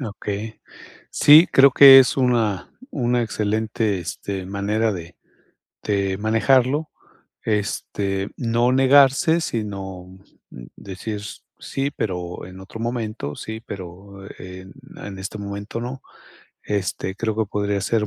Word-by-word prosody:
Okey, 105 -2 -6 0.5
sí, 155 +4 +7
creo 135 0 +7
que 135 +1 +10
es 130 - +3
una 115 -7 0 0.2
una 120 -3 0
excelente, 110 -1 -1
este, 95 +2 -6
manera 105 +3 -1
de 85 -2 -9 0.7
de 100 -2 -1
manejarlo, 130 +7 +2 0.6
este, 100 -2 -2
no 120 +1 +1
negarse, 140 +4 +4
sino 95 - -6 0.6
decir: 100 +2 -7 0.4
"Sí, 140 +1 -3
pero 90 -8 -5
en 95 +1 -12
otro 95 +4 -10
momento, 115 - -4
sí, 110 0 -7
pero 95 +1 -10
en 95 +1 -10 0.2
en 95 -1 -8
este 95 +3 -6
momento 100 +2 -6
no", 125 +2 -6 0.6
este, 95 -1 -3
creo 110 +1 -3
que 110 - +1
podría 100 0 -2
ser 105 0 0
105 Hz, 115 wpm, -22 LUFS, 95-120 Hz, 0.7 s, que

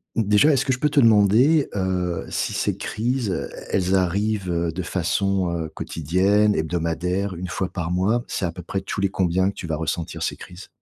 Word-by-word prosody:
déjà, 110 +7 +4
est-ce 135 -1 +2
que 130 - +1
je 125 - -4
peux 150 - +2
te 145 - +2
demander, 115 +7 +5
heu, 90 -3 -1
si - - -2
ces - - 0
crises, 120 0 -2
heu, - - -2 0.2
elles 95 0 +1
arrivent, 100 +1 0
heu, 85 -1 0
de 95 +3 -4
façon, 90 +1 0
heu, 80 -2 -3
quotidienne, 95 +7 +1
hebdomadaire, 90 +4 -1
1 90 +2 -5
fois 90 +2 -3
par 85 -2 -4
mois? 105 +7 +1
C'est 95 - -2
à 85 - -2
peu 90 +1 -9
près 95 +1 -3
tous 100 +1 -4
les 100 - +2
combien 95 +1 +1
que - - -7
tu 85 - -7
vas 80 - -1
ressentir 80 +1 -3
ces - - -1
crises? 90 +2 -11
95 Hz, 205 wpm, -23 LUFS, 85-105 Hz, 0.2 s, demander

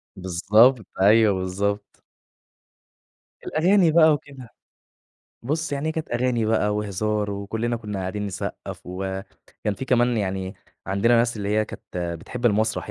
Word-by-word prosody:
بالضبط، 105 +6 +3 0.2
أيوه 105 +1 +6
بالضبط. 95 +2 -3 1.4
الأغاني 175 +2 +3
بقى 160 -1 +6
وكده، 140 -4 -7 0.9
بُصّ 155 +5 -2
يعني 140 +2 -1
هي - - -1
كانت 160 0 -5
أغاني 120 -1 +1
بقى 110 -1 +1
وهزار، 105 0 -1
وكُلّنا 110 +4 -2
كنّا 105 -3 -5
قاعدين 95 +2 -3
نصقّف 95 -2 -6
وكان 95 +2 -5
في 135 - -5
كمان 120 -2 +2
يعني 95 -2 -2 0.3
عندنا 100 +5 +3
ناس 115 0 +2
اللي 100 -1 -3
هي 110 +1 +2
كانت 85 -4 -6
بتحب 125 +7 -3
المسرح 110 -1 0
110 Hz, 130 wpm, -24 LUFS, 100-120 Hz, 1.4 s, أيوه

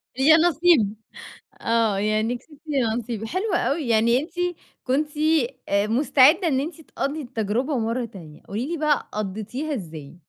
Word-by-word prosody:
يانصيب. 315 - +4 0.7
آه، 225 -3 +1
يعني 215 +4 0
كسبتِ 290 +3 -20
يانصيب. 235 -5 -1
حلو 370 - -2
أوي، 290 -4 0
يعني 230 +2 +3
أنتِ 320 +4 -7 0.5
كنتِ 285 +4 0 0.6
مستعدة 265 - +4
إن 265 -4 +1
أنتِ 320 +2 -5
تقضي 300 0 -4
التجربة 245 +2 -2
مرّة 230 +2 -1
تانية، 170 -9 -12
قولي 225 +7 -3
لي 340 - -2
بقى، 300 -2 0
قضيتِها 215 +9 -4
إزاي؟ 160 - -8
245 Hz, 130 wpm, -23 LUFS, 215-300 Hz, 0.7 s, يانصيب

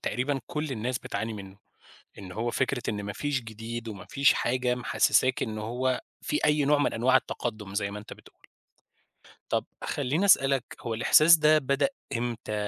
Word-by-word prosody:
تقريبًا 135 +2 -1
كل 150 -1 -3
الناس 125 +1 -2
بتعاني 110 0 -4
منه، 95 -2 -9 0.6
إن 95 -2 -9
هو 115 +4 -2
فكرة 130 0 -1
إن 105 -1 -2
ما 100 0 -5
فيش 145 +4 -2
جديد 115 +1 -7
وما 100 -3 -8
فيش 140 -2 +4
حاجة 125 0 0
محسساك 125 +1 +2
إن 110 -2 -3
هو 125 +4 -1 0.2
في 150 - -1
أي 150 -1 +3
نوع 145 +1 +3
من 145 - +1
أنواع 125 +3 +3
التقدم 110 -6 -4
زي 100 -1 -1
ما 105 - -6
أنت 105 - -11
بتقول. - - -15 1.1
طب - - 0 0.2
خليني 145 +6 -1
أسألك 135 -9 +4 0.2
هو 115 -2 -3
الإحساس 155 +8 +6
ده 155 0 +5
بدأ 140 - +1 0.3
إمتى؟ 115 -2 -4
125 Hz, 170 wpm, -27 LUFS, 110-140 Hz, 1.1 s, الإحساس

